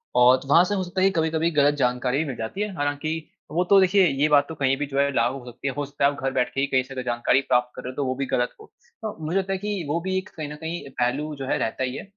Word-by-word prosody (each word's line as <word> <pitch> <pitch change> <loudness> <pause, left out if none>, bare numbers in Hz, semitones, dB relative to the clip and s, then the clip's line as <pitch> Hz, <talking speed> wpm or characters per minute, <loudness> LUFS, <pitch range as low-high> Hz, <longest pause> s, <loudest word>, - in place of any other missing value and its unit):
और 125 +1 +6
वहाँ 155 +5 +6
से 205 +3 -1
हो 190 - -1
सकता 185 +1 -3
है 190 - +6
कि - - +2
कभी-कभी 160 +1 +1
ग़लत 145 -2 +4
जानकारी 125 -1 0
भी 160 - 0
मिल 135 -4 -4
जाती 115 - -5
है, 210 -1 -2
हालांकि 150 +2 -2 0.2
वो 170 +4 +1
तो 200 - +7
देखिए 190 +1 +5
ये 140 0 +2
बात 145 -1 +4
तो 160 - -6
कहीं 135 -2 +1
भी 145 - -2
जो 140 0 -2
है 140 0 +3
लागू 125 +2 +1
होती 125 +3 -7
है 135 - -1
हो 145 - -1
सकता 140 0 -1
है 140 - +5
वो 140 - -9
घर 135 - +1
बैठ 125 -1 0
के - - -2
ही 140 - +1
कहीं 130 -2 +2
से 130 0 -6
जानकारी 120 +2 +2
प्राप्त 125 -1 +2
कर - - -8
रहे 125 - -5
हो - - -15
तो 140 - -1
वो 130 - 0
भी 135 +1 -2
ग़लत 125 -2 0
हो। - - -12 0.4
तो 215 -2 -4
मुझे 170 +5 0
लगता 195 0 0
है - - -1
कि 205 -2 -3
वो 165 +3 +1
भी 190 +1 -1
एक 190 0 -4
कहीं 155 -2 -5
न - - -6
कहीं 160 -2 -5
पहलू 140 +5 0
जो 135 -1 -6
है - - +1
रहता 115 +3 -2
ही 130 0 -2
है। - - -6
145 Hz, 320 wpm, -24 LUFS, 130-170 Hz, 0.4 s, तो